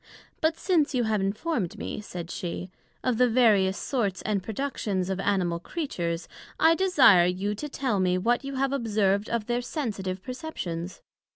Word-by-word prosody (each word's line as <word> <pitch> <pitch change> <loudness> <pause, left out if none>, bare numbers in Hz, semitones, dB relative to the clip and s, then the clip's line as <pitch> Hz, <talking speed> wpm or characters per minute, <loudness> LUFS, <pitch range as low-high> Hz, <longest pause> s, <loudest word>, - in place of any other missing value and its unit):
But 320 +1 +2
since 315 -7 +1
you 245 - +2
have 220 -2 +1
informed 205 - -2
me, - - -5
said 175 -4 -7
she, 180 +1 -5 0.3
of 250 -3 0
the 250 -1 +5
various 210 -6 +4
sorts 205 -8 -1
and 205 -2 0
productions 205 -4 -2
of 190 - -2
Animal 185 -4 0
Creatures, 175 - -3 0.3
I 325 +1 +6
desire 285 - +6
you 190 +3 -1
to 295 +8 -5
tell 260 -7 -1
me 180 -1 +2
what 240 +8 +1
you 275 0 -5
have 270 +1 0
observed 210 -5 +1
of 235 -2 -1
their 240 +1 0
sensitive 200 - -4
perceptions? 190 - -5
210 Hz, 165 wpm, -27 LUFS, 185-260 Hz, 0.3 s, I